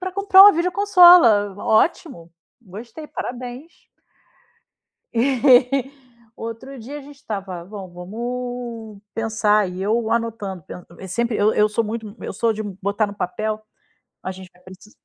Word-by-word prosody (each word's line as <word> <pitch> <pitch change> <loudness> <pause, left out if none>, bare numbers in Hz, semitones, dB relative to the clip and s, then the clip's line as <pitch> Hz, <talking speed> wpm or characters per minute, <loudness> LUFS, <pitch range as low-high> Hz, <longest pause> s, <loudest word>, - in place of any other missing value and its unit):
"pra 370 0 -5
comprar 395 0 +6
uma 410 0 +9
videoconsola. 345 - +5
Ótimo. 215 - 0 0.3
Gostei, 230 - -11
parabéns". 250 +6 -8 1.2
E 260 +1 +3 0.5
outro 230 +4 -8
dia 270 +6 -8
a - - -9
gente 285 +1 -14
estava: 195 -9 -6
"Bom, 195 -1 -9
vamos 230 +2 -6
pensar", 215 -2 +1
e 185 +1 -6
eu 220 +2 0
anotando, 225 -5 -3
pen 180 +3 -11
e 190 - -9
sempre 235 +4 -1
eu 210 +1 +2
eu 210 - +3
sou 220 +2 -1
muito 215 -1 -6
eu - - -6
sou 230 -1 0
de 215 - -5
botar 200 +1 -2
no 205 - -8
papel. 215 +4 -3 0.6
A 185 - -4
gente 185 -1 -13
vai 180 - -26
preci 185 +3 -15
225 Hz, 145 wpm, -21 LUFS, 205-255 Hz, 1.2 s, uma